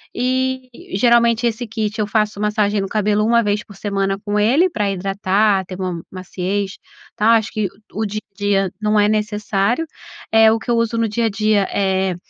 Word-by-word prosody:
eh, 260 Hz, +1 st, -1 dB, 0.3 s
geralmente 235 Hz, 0 st, +3 dB
esse 235 Hz, 0 st, -1 dB
kit 220 Hz, -1 st, -3 dB
eu 210 Hz, -, 0 dB
faço 210 Hz, -1 st, 0 dB
massagem 210 Hz, -1 st, +1 dB
no 195 Hz, -, -2 dB
cabelo 210 Hz, 0 st, +1 dB
1 235 Hz, +1 st, +3 dB
vez 205 Hz, 0 st, 0 dB
por 205 Hz, -, -14 dB
semana 195 Hz, 0 st, -1 dB
com 205 Hz, 0 st, 0 dB
ele, 270 Hz, -, +3 dB
pra 210 Hz, -, -1 dB
hidratar, 195 Hz, +1 st, +1 dB
ter 185 Hz, -, -8 dB
uma 180 Hz, -3 st, -3 dB
maciez, 190 Hz, +2 st, -4 dB, 0.4 s
tá 220 Hz, +2 st, +3 dB
acho 225 Hz, -1 st, +2 dB
que 215 Hz, -2 st, -1 dB, 0.2 s
o 220 Hz, +1 st, -2 dB
dia 215 Hz, +1 st, -4 dB
a -, -, -48 dB
dia 195 Hz, -2 st, +1 dB
não 210 Hz, 0 st, +2 dB
é 205 Hz, 0 st, +4 dB
necessário 210 Hz, +5 st, 0 dB, 0.5 s
eh, 225 Hz, 0 st, +6 dB
o -, -, +1 dB
que 235 Hz, +2 st, -4 dB
eu 235 Hz, -, +2 dB
uso 230 Hz, 0 st, 0 dB
no 225 Hz, -1 st, +1 dB
dia 230 Hz, +2 st, 0 dB
a 225 Hz, -, +2 dB
dia, 210 Hz, -1 st, +1 dB
eh, 190 Hz, -2 st, +1 dB
210 Hz, 195 wpm, -19 LUFS, 195-225 Hz, 0.5 s, eh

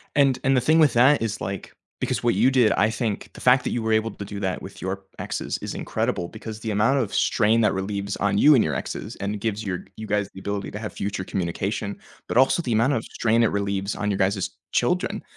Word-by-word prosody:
And 140 Hz, -3 st, +4 dB
and 135 Hz, 0 st, +4 dB
the -, -, +4 dB
thing 155 Hz, +6 st, +3 dB
with 150 Hz, -6 st, +5 dB
that 130 Hz, +3 st, +5 dB
is, 110 Hz, -3 st, -2 dB
like, 100 Hz, -1 st, -5 dB, 0.3 s
because -, -, -1 dB
what 120 Hz, -1 st, +2 dB
you 130 Hz, -, +4 dB
did, 125 Hz, -5 st, +4 dB
I 105 Hz, +2 st, +3 dB
think 110 Hz, -1 st, -3 dB
the -, -, -12 dB
fact 125 Hz, +1 st, +4 dB
that -, -, -1 dB
you 120 Hz, -, -1 dB
were 110 Hz, 0 st, 0 dB
able 110 Hz, 0 st, +1 dB
to 100 Hz, -, -7 dB
do 100 Hz, 0 st, -7 dB
that 95 Hz, -2 st, -2 dB
with -, -, -10 dB
your 95 Hz, +1 st, -4 dB
exes -, -, -3 dB
is -, -, -5 dB
incredible 85 Hz, -1 st, -2 dB
because 110 Hz, 0 st, -8 dB
the 110 Hz, -, -3 dB
amount 110 Hz, +7 st, +2 dB
of 110 Hz, -6 st, -2 dB
strain 115 Hz, +1 st, +3 dB
that 105 Hz, -, +3 dB
relieves 100 Hz, +1 st, -3 dB
on 100 Hz, 0 st, +1 dB
you 150 Hz, +1 st, +7 dB
and 125 Hz, -, +5 dB
your 75 Hz, -3 st, -1 dB
exes -, -, -5 dB
and 100 Hz, +1 st, -3 dB
gives 110 Hz, 0 st, -2 dB
your 90 Hz, -3 st, -3 dB
you 110 Hz, -, -7 dB
guys 105 Hz, -1 st, 0 dB
the 95 Hz, -, -10 dB
ability 100 Hz, 0 st, -3 dB
to 105 Hz, -, -5 dB
have 105 Hz, -1 st, -5 dB
future 100 Hz, -2 st, -3 dB
communication, 95 Hz, +3 st, -3 dB, 0.3 s
but -, -, -3 dB
also 135 Hz, +6 st, +4 dB
the 125 Hz, -7 st, -2 dB
amount 115 Hz, +6 st, +3 dB
of 115 Hz, -5 st, -1 dB
strain 115 Hz, 0 st, +1 dB
it 115 Hz, -, +4 dB
relieves 100 Hz, 0 st, -2 dB
on 105 Hz, 0 st, -1 dB
your 95 Hz, -, -1 dB
guys' 95 Hz, 0 st, 0 dB, 0.2 s
children -, -, 0 dB
105 Hz, 245 wpm, -24 LUFS, 100-120 Hz, 0.3 s, you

